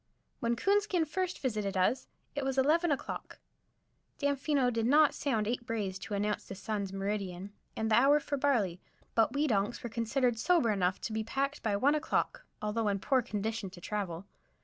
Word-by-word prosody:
When 235 0 +1
Coonskin 395 - +2
first 365 +4 -2
visited 210 -7 -1
us 185 +8 +1 0.3
it 285 - -2
was 270 0 -1
eleven 320 +6 +3
o'clock. 280 - -4 0.8
Damfino 280 -2 +1
did 225 0 0
not 295 +2 +5
sound 220 -7 0
eight 240 +1 -1
brays 210 -6 -3
to 205 - -4
announce 210 +1 -1
the 195 - -6
sun's 200 -1 -3
meridian 195 -1 -3 0.2
and 220 0 -1
the - - +6
hour 275 +5 +6
for 290 0 -3
barley, 230 -11 +1 0.3
but 225 -1 +3
we 290 +2 +1
donks 230 +2 0
were 240 - -5
considered 240 +1 0
sober 330 -6 +3
enough 185 -2 +1
to 220 - -4
be 220 0 -1
packed 275 +5 -2
by 210 -2 0
one 270 +8 +3
o'clock, 305 - -1 0.2
although 210 +1 0
in 200 -1 +1
poor 260 +6 +2
condition 220 -2 -3
to 180 -1 -12
travel. 190 -2 -4
230 Hz, 180 wpm, -31 LUFS, 205-280 Hz, 0.8 s, the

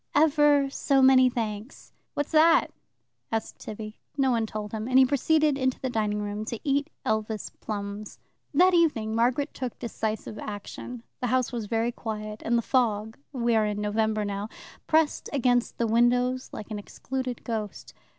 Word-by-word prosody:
"Ever 295 -2 +5
so 275 -1 +2
many 260 -1 +7
thanks." 225 0 -5 0.2
"What's 290 0 -2
that?" 320 +1 +5 0.6
asked 225 -1 -3
Tibby. 215 0 -8 0.2
No 265 -2 +3
one 230 -2 +1
told 210 -1 -5
him, 220 0 -4
and 255 0 +3
he 265 - +8
proceeded 295 +2 +2
into 260 -1 0
the 260 - -3
dining 210 -2 0
room, 205 +1 -3
to 235 0 -4
eat 285 +1 +1 0.2
Elvas 220 -1 -1
plums. 205 0 -5 0.3
That 360 +5 +5
evening 290 -11 +2
Margaret 250 +6 +1
took 255 -3 -5
decisive 220 -2 -4
action. 215 +3 -7 0.2
The 250 - -1
house 255 +1 +1
was 230 -4 -4
very 230 +2 0
quiet, 215 -2 -6
and 235 +1 +2
the 235 - 0
fog 220 -4 +1 0.2
we 240 -4 +1
are 215 -1 +3
in 210 0 -2
November 215 0 0
now 205 +1 -3 0.4
pressed 315 -1 +2
against 245 -3 +1
the 235 - +1
windows 245 +3 +2
like 215 - -8
an 210 - -3
excluded 255 +4 -5
ghost. 220 -3 -5
235 Hz, 165 wpm, -27 LUFS, 215-265 Hz, 0.6 s, he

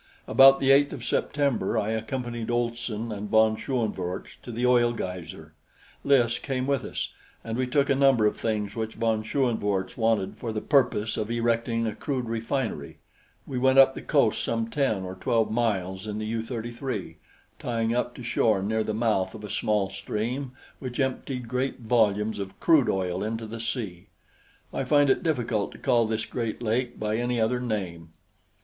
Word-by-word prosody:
About 135 0 +7
the 135 0 +4
8th 140 +1 +5
of 125 -5 -7
September 140 -9 0
I 105 +1 0
accompanied 120 +1 -3
Olson 120 -2 -2
and 105 0 -5
von 110 0 +4
Schoenvorts 105 -8 -3
to 120 - -8
the 120 +2 -1
oil 120 -1 +4
geyser. 85 -6 -6 0.5
Lys 120 -4 +3
came 130 -2 -2
with 140 -1 0
us, - - -4 0.3
and 115 0 -4
we 130 +1 0
took 140 +2 +2
a - - +3
number 135 -5 +4
of 105 - +2
things 105 -2 -2
which 110 -1 -3
von 110 -1 +1
Schoenvorts 110 -6 0
wanted 110 -4 +1
for 115 - -4
the 110 - -2
purpose 120 -5 +2
of 110 0 -2
erecting 115 0 0
a 110 - -1
crude 130 +1 -3
refinery. 115 - -3 0.5
We 130 - -3
went 130 +1 +3
up 135 0 +8
the - - -7
coast - - +2
some 115 0 -1
ten 120 -9 0
or 90 0 -5
twelve 110 +4 0
miles 100 -4 -1
in 105 0 -3
the 110 - -3
U 110 +1 -2
33, 115 - -5 0.4
tying 115 -1 -1
up 125 0 -1
to 125 - -9
shore 110 -4 +2
near 110 +2 0
the 110 - -2
mouth 105 -4 0
of 110 - -9
a 105 - -6
small 105 -2 0
stream 120 +7 -3 0.3
which 130 -1 -6
emptied 130 -2 -2
great 125 +2 -2
volumes 110 -2 +2
of 95 -1 -6
crude 155 -7 +4
oil 95 0 -1
into 110 +1 -3
the 115 +1 -7
sea 110 -7 -4 0.7
I - - -1
find 145 -2 +4
it - - +1
difficult 120 - -1
to - - -11
call 115 -2 +2
this 110 0 -1
great 115 -3 -3
lake 120 +2 -1
by 105 0 -1
any 120 0 -1
other 115 +3 +1
name. 95 -9 -4
115 Hz, 180 wpm, -26 LUFS, 105-125 Hz, 0.7 s, up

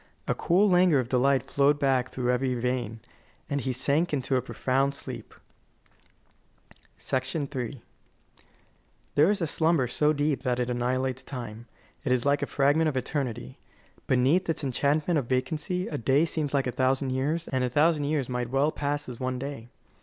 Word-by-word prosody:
A - - +2
cool 190 +5 +3
languor 180 -4 +4
of 120 -2 -3
delight 135 +2 +3
flowed 140 +1 +2
back 135 -3 +1
through 125 -1 -1
every 125 0 0
vein, 120 -2 -2 0.5
and 140 -1 -1
he 130 - -2
sank 140 +7 +1
into 135 -2 0
a 125 - +2
profound 135 +2 0
sleep. - - -8 1.6
III 130 -2 -3 1.3
There 150 +5 +5
is 205 -2 0
a - - +2
slumber 160 -3 +2
so 150 +5 +2
deep 145 -2 0
that 125 -2 -1
it 125 0 -1
annihilates 130 +1 -1
time. 120 -3 -7 0.4
It 140 - -1
is 125 0 +1
like 140 0 +2
a - - -1
fragment 145 +3 +2
of 135 - -3
eternity. 130 -2 -3 0.5
Beneath 135 +9 +2
its 160 - -1
enchantment 150 +5 +1
of 125 - -5
vacancy, 155 +8 -1
a 145 - -4
day 135 +6 +3
seems 155 -3 -2
like 140 -2 +1
a 125 - -1
thousand 130 +1 +1
years, 150 +6 -1
and 130 -1 0
a 125 - 0
thousand 150 +2 +2
years 145 -3 0
might 125 -1 -3
well 135 +4 +2
pass 145 0 -2
as 125 -2 -8
one 130 0 -2
day. 135 -3 -6
135 Hz, 170 wpm, -27 LUFS, 125-150 Hz, 1.6 s, There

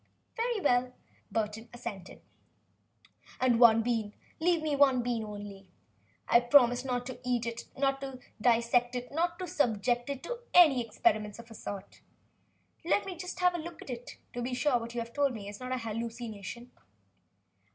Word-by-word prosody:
"Very 470 -1 0
well," 250 -6 +2 0.4
Burton 220 +1 -2
assented. 230 -6 -8 1.2
"And 250 -2 +3
one 225 -2 +7
bean?" 230 -2 0
the - - -7
professor 205 - -17
begged. - - -16
"Leave 340 -2 +3
me 300 -2 0
one 270 -3 +4
bean 235 -2 -1
only? 205 -2 -8 0.6
I 235 - +6
promise 245 0 +5
not 245 -2 -2
to 250 -1 -7
eat 245 -2 0
it, 230 0 -5
not 270 0 +1
to 270 -1 -6 0.2
dissect 240 +1 +3
it, 245 0 -5
not 340 +4 0
to 370 - -4
subject 245 - +1
it 275 -2 -4
to - - -4 0.2
experiments 250 - +4
of 235 0 -12
any - - -8
sort. 200 -2 -8 0.8
Let 370 +5 +2
me 380 -2 -5
just 365 +1 -6
have 360 0 +4
it 345 - -3
to - - -6
look 340 -1 -8
at, 245 -2 -7 0.2
to 245 - -4
be 250 +1 -2
sure 295 +3 +1
that 245 -2 +2
what 235 +1 -7
you 235 - -1
have 230 0 -8
told 280 -3 +1
me 205 -2 -7
is 205 0 -8
not 255 0 -6
an 255 - 0
hallucination." 230 -1 -6
245 Hz, 185 wpm, -30 LUFS, 230-280 Hz, 1.2 s, one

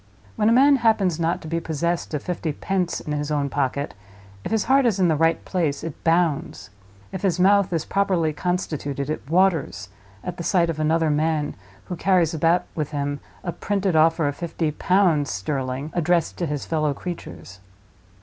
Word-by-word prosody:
When 210 - +2
a - - +4
man 275 +4 +6
happens 205 -8 +2
not 165 +1 0
to - - -7
be 165 +1 -1
possessed 165 0 -2
of 145 - -4
fifty 170 -3 -3
pence 185 +2 -2
in 150 - -4
his 145 0 -2
own 145 -2 0
pocket, 140 +1 -1 0.5
if - - -4
his 220 -2 +2
heart 270 0 +4
is 205 -4 0
in 180 -2 +4
the 160 - +3
right 165 +2 +1
place, 160 -7 -1
it 165 -3 -7
bounds; 165 - 0 0.4
if 190 - -5
his 185 -3 0
mouth 200 +1 +4
is 165 -3 -1
properly 185 -6 +1
constituted, 150 -4 -2
it - - -3
waters, 160 - +1 0.3
at 180 - -5
the 170 - -5
sight 170 -2 +2
of 155 - -7
another 160 0 +2
man 150 0 0 0.3
who 180 - -5
carries 175 -2 +2
about 165 +3 +2
with 155 -3 -3
him 145 -1 -3 0.2
a 175 - -2
printed 195 -1 -1
offer 160 0 +4
of 145 - -2
fifty 165 -1 -2
pounds 170 -3 +2
sterling, 130 +6 -3
addressed 175 -1 +1
to 170 - -1
his 145 -2 -3
fellow 155 -3 0
creatures. 100 - -8
165 Hz, 185 wpm, -23 LUFS, 150-180 Hz, 0.5 s, man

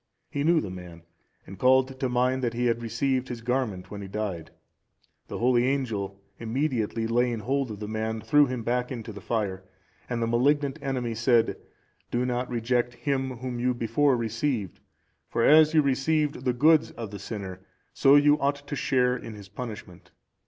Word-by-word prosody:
He 140 - -1
knew 165 +1 +4
the 95 - -5
man, 90 -2 -10 0.4
and 95 -1 -11
called 130 +1 +3
to 130 - 0
mind 125 +1 +1
that 120 -1 -1
he 120 +1 0
had 120 -1 +1
received 130 +3 -1
his 120 -2 -6
garment 115 -7 -2
when 100 -1 -6
he 100 - -7
died. 95 -4 -4 0.8
The - - -5
holy 120 0 +3
angel, 110 -8 -2 0.2
immediately 115 -2 -1
laying 120 0 +1
hold 135 +3 -1
of 105 -2 -7
the 105 - -5
man, 110 +1 -2
threw 140 +7 +4
him 125 -2 -4
back 125 +2 -1
into 115 -3 -6
the 100 - -9
fire, 100 -5 -2 0.5
and 120 -1 -1
the 115 - +1
malignant 140 +4 +1
enemy 125 -4 -2
said, 115 +1 +2 0.5
"Do 120 +1 0
not 125 0 -2
reject 120 0 0
him 130 0 -2
whom 125 0 -5
you 125 +1 +1
before 120 +4 +2
received; 115 - -2 0.5
for 115 - 0
as 155 +3 +6
you 155 - +6
received 140 0 0
the 125 - +2
goods 155 +5 +4
of 115 -3 -7
the 100 - -7
sinner, 95 -3 -6 0.3
so 135 +1 +5
you 145 +1 +5
ought 140 0 -1
to 145 - -3
share 125 -2 +2
in 115 -3 -8
his 100 -1 -12
punishment." 105 -5 -8
120 Hz, 180 wpm, -27 LUFS, 110-135 Hz, 0.8 s, as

